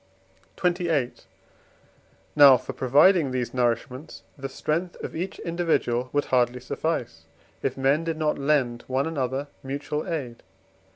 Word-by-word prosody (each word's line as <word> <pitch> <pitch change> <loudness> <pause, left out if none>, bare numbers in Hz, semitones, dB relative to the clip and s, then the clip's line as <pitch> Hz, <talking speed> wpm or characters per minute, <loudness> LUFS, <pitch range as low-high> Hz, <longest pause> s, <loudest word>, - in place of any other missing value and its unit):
XXVIII. 170 -7 +1 1.2
Now 140 -3 +9
for 130 +2 -7
providing 145 +6 +4
these 130 -2 -2
nourishments 125 +3 -2
the 135 -1 -6
strength 165 +6 -2
of - - -6
each 180 +4 -4
individual 160 -8 0
would 145 0 0
hardly 125 -1 +1
suffice, 125 - -3 0.4
if 135 -1 -2
men 135 +4 +2
did 165 -1 -3
not 155 -2 0
lend 135 -5 +1
one 130 +1 0
another 135 -3 -2 0.2
mutual 145 +4 -4
aid. 130 -8 -4
135 Hz, 125 wpm, -25 LUFS, 125-160 Hz, 1.2 s, Now